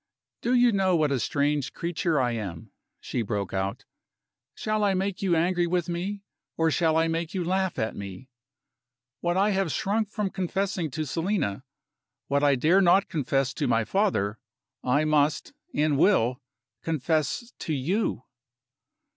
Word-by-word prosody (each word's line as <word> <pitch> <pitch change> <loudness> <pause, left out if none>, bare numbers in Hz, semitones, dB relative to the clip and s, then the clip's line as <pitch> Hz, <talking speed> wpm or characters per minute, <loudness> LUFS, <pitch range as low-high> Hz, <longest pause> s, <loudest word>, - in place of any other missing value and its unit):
"Do 245 +2 +1
you 245 -1 +5
know 190 -3 +2
what 155 -3 +2
a 135 - +1
strange 145 +4 0
creature 170 -2 -1
I 125 -2 +1
am?" 100 -8 -5 0.3
she 120 - -2
broke 100 -3 -3
out. 95 +1 -2 0.7
"Shall 215 0 -1
I 200 -2 +3
make 190 0 -2
you 185 -3 +2
angry 175 +1 +2
with 175 0 0
me? 190 +4 -3 0.3
or 160 0 +2
shall 160 0 +2
I 165 0 +3
make 165 +2 -2
you 185 - 0
laugh 190 +1 0
at 110 0 -2
me? 100 +5 -8 0.9
What 175 +1 0
I 200 +2 +3
have 190 -4 0
shrunk 210 +5 0
from 210 -3 -2
confessing 190 -2 -2
to 155 +3 -3
Selina 160 - -1 0.7
what 140 +1 +2
I 140 -1 +5
dare 165 +9 +4
not 190 +2 +4
confess 135 -5 0
to - - -1
my 115 -1 +2
father 110 - 0 0.4
I 145 +5 +2
must, 150 -1 +1 0.2
and 150 -1 +1
will, 130 - +3 0.4
confess 160 - -1
to - - -4
You." 165 - -1
165 Hz, 155 wpm, -26 LUFS, 135-190 Hz, 0.9 s, you